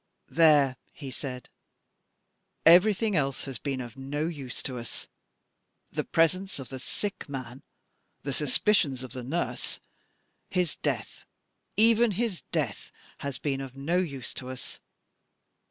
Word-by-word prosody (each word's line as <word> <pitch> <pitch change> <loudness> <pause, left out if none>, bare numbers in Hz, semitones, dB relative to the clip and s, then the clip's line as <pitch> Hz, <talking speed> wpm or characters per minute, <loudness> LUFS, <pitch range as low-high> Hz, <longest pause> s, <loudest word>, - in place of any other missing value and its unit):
"There," 145 -6 +6
he 140 -3 -8
said, 125 -1 -5 1.2
"everything 200 +5 +7
else 140 -4 0
has 135 -4 -5
been 135 -3 -2
of 120 -1 -6
no 145 +3 -2
use 145 -7 -5
to 125 -2 -3
us 115 - -6 0.8
the - - -1
presence 185 +4 +2
of 135 -3 -6
the 130 - -6
sick 200 +6 -4
man 130 -2 -6 0.6
the 140 - -2
suspicions 145 - +3
of 125 -2 -7
the 125 - -5
nurse 160 +8 -2 0.7
his 180 -4 +1
death - - -3 0.5
even 225 0 +6
his 215 -2 -1
death 145 -11 -1 0.3
has 140 -2 -3
been 135 -2 -1
of 135 -1 -8
no 165 +6 +1
use 140 -9 -3
to 130 - -6
us. 130 -1 -6
140 Hz, 135 wpm, -29 LUFS, 130-175 Hz, 1.2 s, everything